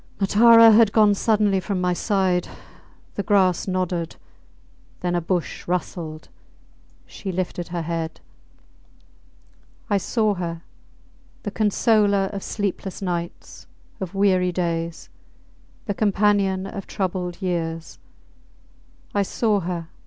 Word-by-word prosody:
Matara 230 +3 +7
had 220 -1 +6
gone 210 -1 +5
suddenly 205 -1 +2
from 190 0 -3
my 180 0 +1
side. 185 -2 0 0.7
The - - -2
grass 190 -3 +2
nodded. 180 -3 -2 0.9
Then 180 -1 -1
a 175 - +1
bush 175 0 -3
rustled. 170 -3 -4 0.8
She 195 - -6
lifted 175 -1 -3
her 175 -1 -4
head. 165 0 -4 1.7
I 200 - +3
saw 215 +2 +1
her! 170 -3 -5 0.8
The 205 - -3
consoler 205 -2 +2
of 200 - -4
sleepless 200 -2 -4
nights, 175 -2 -5 0.3
of 190 -1 -6
weary 185 -2 +3
days; 170 -2 -3 0.8
the 205 - -1
companion 200 -2 +2
of 195 0 -7
troubled 180 -3 -3
years! 165 -3 -3 1.1
I 205 - +2
saw 210 +1 +1
her! 170 -2 -4
190 Hz, 110 wpm, -23 LUFS, 175-205 Hz, 1.7 s, Matara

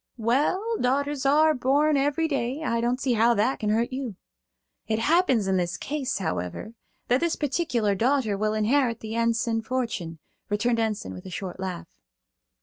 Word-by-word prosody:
"Well, 300 - +1
daughters 275 +2 0
are 310 +3 +5
born 290 +3 +2
every 290 +4 +1
day. 275 0 -2
I 235 -6 0
don't 245 +2 0
see 265 -2 +1
how 235 +1 +4
that 225 +6 +1
can 210 - -1
hurt 230 +4 +1
you." 255 -6 -4 0.7
"It 220 - 0
happens 265 - +3
in 190 -1 +1
this 175 0 -1
case, 280 -2 -3
however, 90 - -4 0.3
that 250 +2 +3
this 340 +1 0
particular 255 - 0
daughter 235 0 +1
will 215 +2 0
inherit 230 +2 +1
the 220 0 -6
Enson 230 0 +1
fortune," 225 -9 -3 0.3
returned 230 +3 +1
Enson 215 - -2
with 90 - -9
a - - -7
short 185 0 -6
laugh. 185 -2 -5
235 Hz, 165 wpm, -26 LUFS, 215-275 Hz, 0.7 s, are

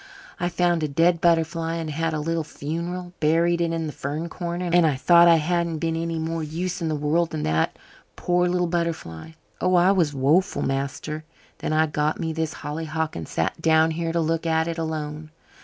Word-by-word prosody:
I 175 - 0
found 175 -1 +1
a 155 - 0
dead 165 +4 +2
butterfly 165 -1 +1
and 165 -2 -3
had 165 +2 -1
a - - -1
little 165 +1 -1
funeral 170 +4 -5
buried 170 +2 +2
it 170 -1 +1
in 165 -1 -2
the 150 - -5
fern 150 +5 -4
corner. 175 0 -4
And 175 0 +6
I 150 - +1
thought 170 +5 +6
I 170 - +7
hadn't 170 +1 0
been 165 +1 -1
any 165 0 -2
more 160 +1 -2
use 175 +4 -3
in 165 - -1
the 155 - 0
world 155 +3 +1
than 155 -2 -4
that 80 +1 0 0.4
poor 180 0 +1
little 180 0 +1
butterfly. 165 - -3 0.3
Oh, 185 0 +3
I 180 +2 +5
was 175 -6 +2
woeful, 150 +8 +2
master. 140 +3 -3 0.4
Then - - -3
I 155 +1 +3
got 150 0 -1
me 160 -1 -2
this 160 -1 -2
hollyhock 160 +1 -3
and 80 -2 -5
sat 80 - -2
down 160 0 +4
here 165 +1 -2
to 170 - 0
look 165 +1 -1
at 160 0 +1
it 165 0 -3
alone. 155 -1 -4
165 Hz, 205 wpm, -24 LUFS, 155-170 Hz, 0.4 s, I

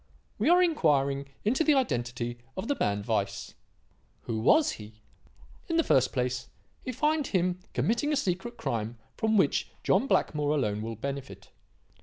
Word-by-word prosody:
We 230 +9 +2
are 355 +1 +6
inquiring 140 - +2 0.2
into 255 +9 +2
the 305 -2 +4
identity 120 - -1 0.2
of 190 - -3
the 285 - +1
man 100 0 0
Weiss. 105 -4 -2 0.7
Who 110 -1 -3
was 295 - +4
he? 105 0 -9 0.8
"In 330 - +1
the 330 - +4
first 130 - +3
place, 125 -1 -2 0.3
we 255 - -3
find 300 +3 +1
him 180 -1 0 0.2
committing 240 +7 +1
a - - +2
secret 235 -1 -2
crime 115 +1 -3 0.2
from 220 -1 +1
which 190 - +2
John 275 - +2
Blackmore 150 - +1
alone 105 -7 0
will 115 +1 -4
benefit. 140 +4 -6
150 Hz, 155 wpm, -28 LUFS, -, 0.8 s, are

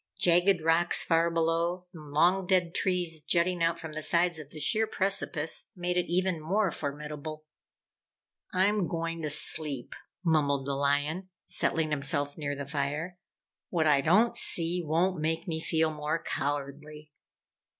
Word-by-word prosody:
Jagged 175 +1 +3
rocks 165 +2 +3
far 165 0 +2
below, 165 +2 -1
and 155 -4 -11
long 180 +5 +2
dead 180 -2 +1
trees 175 -4 -1
jutting 175 +2 +1
out 165 0 +1
from 160 -2 -8
the 155 - -4
sides 170 +1 +1
of 150 -2 -10
the 155 - -10
sheer 220 +7 +2
precipice, 190 -6 0
made 180 -1 -2
it 180 - 0
even 180 -1 0
more 190 +4 0
formidable. 150 +1 -6 1.1
"I'm 195 0 +1
going 165 0 -3
to 155 - -2
sleep," 145 -3 +2 0.3
mumbled 140 -4 +1
the 140 - -2
lion, 145 +6 -1 0.2
settling 160 -2 +1
himself 145 0 0
near 145 -2 -4
the 140 0 -6
fire. 150 +5 -3 0.5
"What 165 -3 0
I 145 -2 +4
don't 215 - +3
see, 175 -5 +2
won't 165 +2 0
make 160 +2 -1
me 160 -2 -2
feel 160 0 0
more 150 +1 -2
cowardly." 145 +1 -5
165 Hz, 150 wpm, -29 LUFS, 150-180 Hz, 1.1 s, I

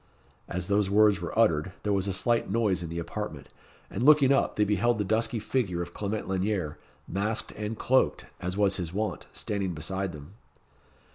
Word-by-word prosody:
As 90 0 -3
those 100 -1 +2
words 105 -2 +4
were 85 - -5
uttered, 90 -6 +3
there 105 - +1
was 95 0 0
a - - 0
slight 115 +5 +1
noise 100 -4 +1
in 85 - -5
the 85 - -5
apartment, 85 - -5 0.4
and - - -5
looking 140 0 +6
up, 135 - +1
they 105 - +3
beheld 105 +3 +2
the 105 - 0
dusky 110 +4 0
figure 100 -7 -1
of 85 0 -10
Clement 105 +1 -3
Lanyere, 95 -4 -1 0.3
masked 105 +4 -2
and 105 +1 -5
cloaked, 130 +1 +2
as 90 +2 -3
was 100 -2 +3
his 85 -3 -4
wont, 105 +3 -3
standing 100 -4 -2
beside 95 +4 -2
them. 75 +2 -11
100 Hz, 185 wpm, -28 LUFS, 90-110 Hz, 0.4 s, looking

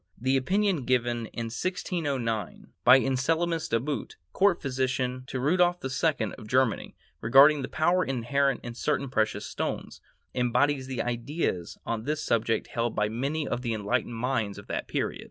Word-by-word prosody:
The 130 +3 +1
opinion 185 +2 +1
given 120 -2 0
in 115 - -5
1609, 140 - -3
by 125 +2 +8
Anselmus 160 +6 0
De 115 - +2
Boot, 135 -1 -4 0.2
court 195 -2 +3
physician 130 -1 -1
to 130 - -3
Rudolph 175 +6 +3
II 135 -4 0
of 110 - -10
Germany, 130 -2 +1 0.3
regarding 140 +6 +6
the 130 - -3
power 175 +4 +2
inherent 135 0 0
in 120 - -6
certain 140 +1 -1
precious 110 -4 0
stones, - - -4 0.3
embodies 130 +3 +1
the 130 -3 -2
ideas 120 - -2
on 115 -1 -3
this 150 +1 -2
subject 115 -1 +1
held 115 -1 -1
by 105 0 +1
many 140 +6 -2
of 120 - -2
the 115 -3 -1
enlightened 105 +3 -1
minds 115 -4 -1
of 100 - -10
that - - -4
period. - - -2
130 Hz, 155 wpm, -28 LUFS, 115-145 Hz, 0.3 s, by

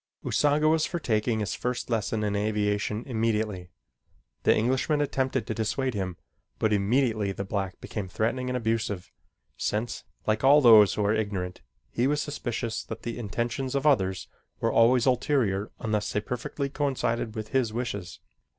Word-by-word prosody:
Usanga 150 +1 +2
was 160 0 +3
for 175 - -3
taking 110 -5 0
his 105 - -2
first 125 0 -3
lesson 110 -2 -1
in 105 -1 0
aviation 105 +1 0
immediately. 110 -6 -1 0.7
The - - +4
Englishman 130 +6 +1
attempted 130 -4 0
to 115 - -3
dissuade 115 +4 -1
him, 95 -4 -3 0.4
but 110 -1 +1
immediately 110 0 +1
the 100 - -4
black 95 -1 -3
became 105 -4 -5
threatening 115 +7 -1
and 125 - 0
abusive, 110 -5 -2 0.5
since, 110 +3 -2 0.2
like 110 +1 0
all 140 +3 +7
those 110 -7 +7
who 105 - 0
are 105 - +3
ignorant, 100 -5 -2 0.3
he 120 +2 +1
was 150 +1 +1
suspicious 120 -6 -3
that 115 - -7
the 120 +1 -4
intentions 120 +4 -2
of 140 - 0
others 95 -11 +2 0.3
were - - +1
always 120 +1 +4
ulterior 120 -6 +1
unless 105 -1 -1
they 105 - +1
perfectly 125 +5 -3
coincided 130 -5 -1
with 110 -1 -5
his 130 -5 +1
wishes. 110 -6 -4
115 Hz, 160 wpm, -27 LUFS, 105-130 Hz, 0.7 s, all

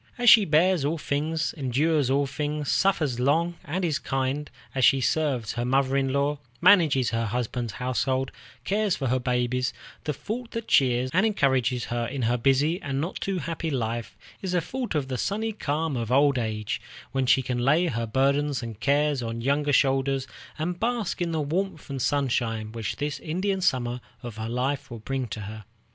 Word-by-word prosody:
As 245 -2 +7
she 220 -3 +8
bears 165 +1 +3
all 155 +4 0
things, 155 +2 -1
endures 145 +1 +1
all 140 +1 +2
things, 150 +1 -2
suffers 155 -10 +1
long, 160 +7 +2
and 180 +5 -2
is 155 -4 0
kind, 135 +2 -2 0.2
as 130 - 0
she 135 +2 +6
serves 130 -4 0
her 120 - -2
mother 135 +2 +2
in 135 -1 +1
law, 140 +1 0 0.2
manages 165 -9 +5
her 115 0 0
husband's 120 -1 -2
household, 130 +2 -1 0.3
cares 205 +3 +1
for 135 -3 -2
her 130 +1 +2
babies, 125 0 0 0.3
the 150 - 0
thought 230 - -5
that 230 -1 -4
cheers 130 -1 +3
and 185 - +4
encourages 130 - +1
her 120 -1 -1
in 130 +1 -3
her 120 +2 +2
busy 140 +8 +2
and 135 -1 -2
not 165 +6 -3
too 195 -1 -1
happy 165 -1 -3
life 120 -4 -3 0.2
is 185 -2 -3
the 180 - +2
thought 250 -5 -4
of 145 -3 0
the 130 -2 -3
sunny 220 +3 -1
calm 155 -6 -2
of 115 -1 -3
old 140 0 +4
age, 110 -2 -3 0.3
when 135 -1 0
she 130 +1 +4
can 125 0 -2
lay 150 +8 +3
her 115 -7 -2
burdens 140 +3 +1
and 115 -3 -7
cares 145 +3 +2
on 115 0 -4
younger 145 +3 +1
shoulders, 135 -1 +2 0.3
and 175 +3 -3
bask 230 -6 -1
in 170 -1 0
the 160 - -1
warmth 160 +1 -2
and 135 -2 -3
sunshine 120 -6 0
which 115 -3 -4
this 145 0 -3
Indian 190 +4 -1
Summer 125 -7 0 0.2
of 120 -3 -7
her 110 +1 -4
life 130 +4 -1
will 120 - -7
bring 130 +3 -3
to 110 0 -6
her. 105 +1 -8
135 Hz, 190 wpm, -26 LUFS, 125-160 Hz, 0.3 s, she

